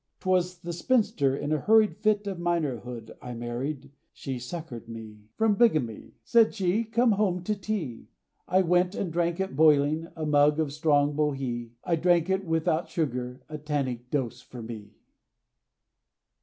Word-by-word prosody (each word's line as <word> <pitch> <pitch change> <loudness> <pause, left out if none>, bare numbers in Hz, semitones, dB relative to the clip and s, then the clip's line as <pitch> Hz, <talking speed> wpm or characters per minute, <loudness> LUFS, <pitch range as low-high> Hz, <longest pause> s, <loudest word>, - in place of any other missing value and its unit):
'Twas 180 -1 0
the 170 0 -5
spinster, 170 - +1
in 145 - -3
a 155 - +2
hurried 220 +2 +4
Fit 210 -1 +1
of 195 -3 -4
minorhood, 130 -9 -2
I 125 -1 -7
married, 130 +4 -4 0.2
She 130 -2 -5
succoured 125 -3 -7
me 110 -2 -10
From 220 -1 +3
bigamy, 155 - +1
Said 230 -2 +4
she, 200 +3 +1
"Come 235 +2 +2
home 195 -4 +1
to 210 - 0
tea!" 185 - -4 0.4
I 185 +1 +3
went, 180 +2 +2
and 175 -5 -3
drank 170 0 0
it 190 -7 -2
boiling, 155 +1 +4
A 160 -2 -3
mug 150 +1 +4
of 150 -3 -1
strong 145 -1 +2
Bohea! 135 -6 -1
I 170 -2 +1
drank 175 +1 +3
it, 190 +1 +1
without 160 0 0
sugar, 125 -5 -3
A 155 -1 -7
tannic 135 -5 -3
dose, 125 -3 -2
for 125 -2 -10
me! 110 -2 -9
155 Hz, 155 wpm, -27 LUFS, 130-180 Hz, 0.4 s, hurried